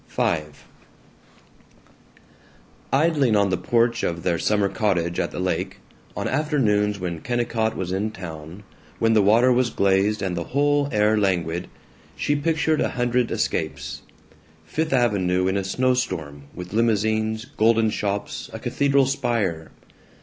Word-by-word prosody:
V 80 - 0 2.5
Idling 140 -4 +3
on 100 -2 +2
the - - +2
porch 115 +5 +1
of 85 0 -2
their 85 -2 0
summer 105 -1 +2
cottage 90 -6 -1
at - - 0
the - - -7
lake, 95 +1 -2 0.4
on - - -2
afternoons 110 -9 +1
when 85 -3 -4
Kennicott 115 -1 -1
was 90 -1 -3
in 100 +3 -1
town, 85 -1 -9 0.3
when 115 0 +2
the 110 - +5
water 115 +6 +4
was 125 0 +2
glazed 100 +1 +1
and 95 -2 -1
the 85 -1 -3
whole 145 0 +2
air 105 -1 +3
languid, 90 -3 0 0.5
she 145 - 0
pictured 155 +1 +1
a - - +1
hundred 120 -1 0
escapes: - - -3 0.6
Fifth 160 - -2
Avenue 100 -8 +2
in 95 - 0
a 100 - 0
snow 125 +7 +1
storm, 75 - -3
with 90 +1 -8
limousines, 110 0 +1
golden 115 -4 +2
shops, 100 -1 -3
a - - -6
cathedral 140 -1 +2
spire. 115 - -1
105 Hz, 140 wpm, -23 LUFS, 95-125 Hz, 2.5 s, the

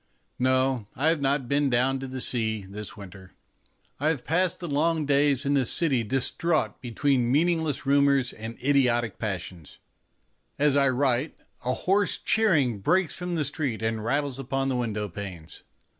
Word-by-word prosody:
No, 130 -3 +1
I 150 +5 +2
have 165 -3 +1
not 135 -1 0
been 140 +2 +2
down 130 +2 +1
to 135 - -6
the 130 0 -5
sea 110 -5 -1
this 100 +2 -8
winter. 95 -1 -12 0.7
I 145 - 0
have 155 -6 -1
passed 180 +2 +1
the 175 - -5
long 155 +1 +1
days 140 -1 +2
in 140 +1 +2
a 135 - +3
city 135 -1 +1
distraught 135 +2 -1
between 125 0 0
meaningless 160 -1 +1
rumours 140 -2 +3
and 110 +1 -8
idiotic 125 -5 +2
passions. 90 -7 -5 0.8
As 145 -1 +2
I 140 -1 +4
write 130 +2 0 0.3
a 125 +1 0
hoarse 195 +1 +1
cheering 150 - +2
breaks 175 - +1
from 180 -1 -4
the 155 - +1
street 140 -5 -2
and 110 -1 -1
rattles 140 +2 -1
upon 135 +1 -2
the 130 - 0
window 110 -4 -2
panes. 90 -4 -8
135 Hz, 160 wpm, -26 LUFS, 115-145 Hz, 0.8 s, I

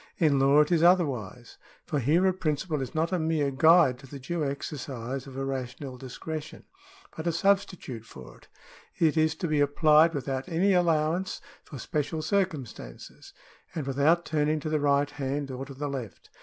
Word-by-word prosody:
In 150 -5 +3
law 140 +2 +5
it 150 - 0
is 170 -2 +3
otherwise, 135 - +1 0.3
for 150 -4 -1
here 155 +9 +2
a 190 - +3
principle 155 -3 -2
is 130 - -6
not 160 +3 0
a 185 - 0
mere 160 -3 0
guide 150 -2 +5
to 135 - -13
the 140 - -9
due 155 +5 -3
exercise 135 -2 -5
of 135 -1 -10
a 135 - -2
rational 130 0 -5
discretion, 150 +5 -7 0.5
but 160 +2 -5
a - - +3
substitute 180 - 0
for 65 - -12
it. - - -22 0.5
It 160 -2 +2
is 155 0 +2
to 170 - -3
be 155 -2 +1
applied 155 +3 +4
without 135 +2 -3
any 185 +4 +2
allowance 170 +1 +1 0.2
for 140 - -10
special 155 +4 -3
circumstances, 155 - -4 0.4
and 155 -4 -3
without 145 +6 +2
turning 155 0 0
to 155 - -4
the 155 0 +1
right 145 0 +2
hand 140 0 -3
or 130 +1 -5
to 135 - -10
the 145 +2 -4
left. 130 -7 -7
150 Hz, 180 wpm, -27 LUFS, 135-165 Hz, 0.5 s, law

